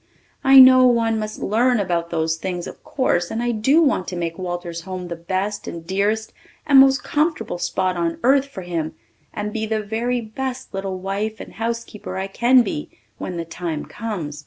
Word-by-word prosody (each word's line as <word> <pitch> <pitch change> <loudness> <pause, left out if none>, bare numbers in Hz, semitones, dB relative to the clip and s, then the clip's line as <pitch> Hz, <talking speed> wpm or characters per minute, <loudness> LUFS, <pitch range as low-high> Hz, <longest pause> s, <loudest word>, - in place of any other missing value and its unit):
I 270 0 +7
know 255 -1 +9
one 230 -2 +2
must 215 0 -4
learn 240 +3 +2
about 170 -3 -1
those 160 -1 0
things 180 0 -4
of - - -10
course 175 -10 0
and 230 +2 -2
I 240 - +1
do 265 +9 +3
want 260 -10 +1
to 180 - -4
make 170 0 -3
Walter's 175 -2 -4
home 180 0 -6
the 170 - -4
best 190 +5 -3
and 165 -1 -7
dearest 205 +4 -1 0.3
and 280 -3 +7
most 270 0 +5
comfortable 305 - -1
spot 185 +1 -1
on 170 -1 -1
earth 270 +2 +4
for 215 -9 -8
him 165 -3 -3 0.4
and 210 0 -4
be 220 -1 -2
the 215 -1 -1
very 235 +4 -1
best 250 +3 -5
little 195 -1 -3
wife 200 +4 -3
and - - -9
housekeeper 225 -4 -4
I 190 - -2
can 240 +5 +4
be 150 -8 -4 0.3
when 180 - -5
the 165 - -3
time 165 -2 -4
comes. 180 -10 -5
205 Hz, 190 wpm, -21 LUFS, 175-240 Hz, 0.4 s, know